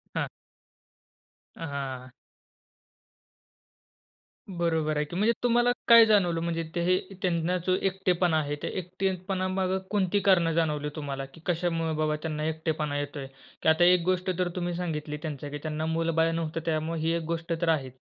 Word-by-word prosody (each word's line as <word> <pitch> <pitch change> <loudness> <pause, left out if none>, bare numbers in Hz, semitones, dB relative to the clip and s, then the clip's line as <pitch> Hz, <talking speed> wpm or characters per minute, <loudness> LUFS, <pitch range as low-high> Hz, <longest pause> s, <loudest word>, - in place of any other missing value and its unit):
हां. - - 0 1.3
हां. 135 -5 -5 2.4
बरोबर 160 -4 0
आहे 150 - +1
की. 170 - -8
म्हणजे 215 +5 +3
तुम्हाला 240 0 +4 0.2
काय 230 -1 +9
जाणवलं? 185 -6 +3
म्हणजे 165 0 -1
ते 170 - +1
हे 185 +1 +3 0.2
त्यांना 175 0 +1
जो 185 - +4
एकटेपणा 180 -3 +1
आहे, 145 -1 -2
ते - - -1
एकटेपणामागे 185 +1 -1
कोणती 205 -1 +1
कारणं 185 -4 +4
जाणवली 150 -3 0
तुम्हाला? 140 -3 -4
की 135 +4 -16
कशामुळे 165 -2 0
बाबा 155 -1 +1
त्यांना 155 -1 -3
एकटेपणा 155 -2 -1
येतोय? 145 -1 -5 0.3
की - - +3
आता 160 +2 +4
एक 180 0 +6
गोष्ट 185 0 +1
तर 180 -1 +1
तुम्ही 175 -1 -2
सांगितली 155 -4 -3
त्यांच्या, 145 -2 -5
की 145 - -5
त्यांना 155 0 -2
मुल-बाळ 165 0 +1
नव्हतं 165 -1 -2
त्यामुळे 160 0 -1
ही 160 +1 +1
एक 170 - -2
गोष्ट 165 +1 -3
तर 170 - +2
आहे. 145 -5 +1
165 Hz, 155 wpm, -28 LUFS, 155-180 Hz, 2.4 s, काय